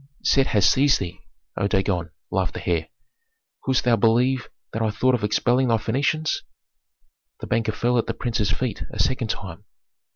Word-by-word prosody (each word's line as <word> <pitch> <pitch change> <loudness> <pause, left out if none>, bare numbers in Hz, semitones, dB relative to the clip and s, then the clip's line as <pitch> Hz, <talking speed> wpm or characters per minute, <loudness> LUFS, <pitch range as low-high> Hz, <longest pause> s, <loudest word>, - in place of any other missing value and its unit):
"Set 135 -1 +3
has 100 -3 +3
seized 135 +5 +4
thee, 95 0 -5 0.4
O 100 - +1
Dagon," 95 -4 0 0.2
laughed - - -1
the - - -7
heir. 85 -2 0 0.8
"Couldst 130 -1 +1
thou 120 -2 +4
believe 120 +3 +2 0.2
that 115 - -2
I 110 - +2
thought 130 +5 +1
of 120 -4 0
expelling 120 +5 +2
thy 115 -1 +3
Phœnicians?" 145 +7 0 1.0
The - - -6
banker 115 -2 0
fell 120 +3 +1
at - - -1
the - - -2
prince's 110 -4 -1
feet 120 +3 -2
a - - -8
second 130 -3 0
time. 95 -5 -6
115 Hz, 170 wpm, -23 LUFS, 105-125 Hz, 1.0 s, seized